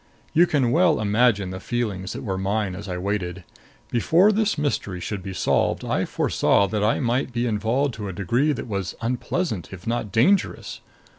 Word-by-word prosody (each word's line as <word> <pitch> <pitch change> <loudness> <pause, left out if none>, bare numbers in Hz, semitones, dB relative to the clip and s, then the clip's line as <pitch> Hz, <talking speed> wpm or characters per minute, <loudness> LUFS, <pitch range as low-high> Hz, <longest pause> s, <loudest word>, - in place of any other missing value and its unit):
You 175 +3 +5
can 135 -7 +1
well 170 +2 +3
imagine 105 -2 +2
the 95 - -6
feelings 100 -6 -3
that - - -6
were 95 -3 -2
mine 100 0 -1
as 100 +1 -8
I 90 - -3
waited. 95 -1 -3 0.5
Before 170 - +4
this 215 -3 +1
mystery 135 -11 -2
should 100 +2 -4
be 95 +1 -6
solved, 90 - 0
I - - 0
foresaw 100 - +2
that 105 -1 -1
I 110 - +2
might 125 +1 0
be 120 0 -1
involved 115 +5 0
to 105 -2 -6
a - - -4
degree 115 - +1
that 140 - -3
was 100 -5 -4
unpleasant 120 - -2
if 95 -2 -10
not 115 -3 -2
dangerous. 155 - +1
110 Hz, 180 wpm, -23 LUFS, 95-130 Hz, 0.5 s, You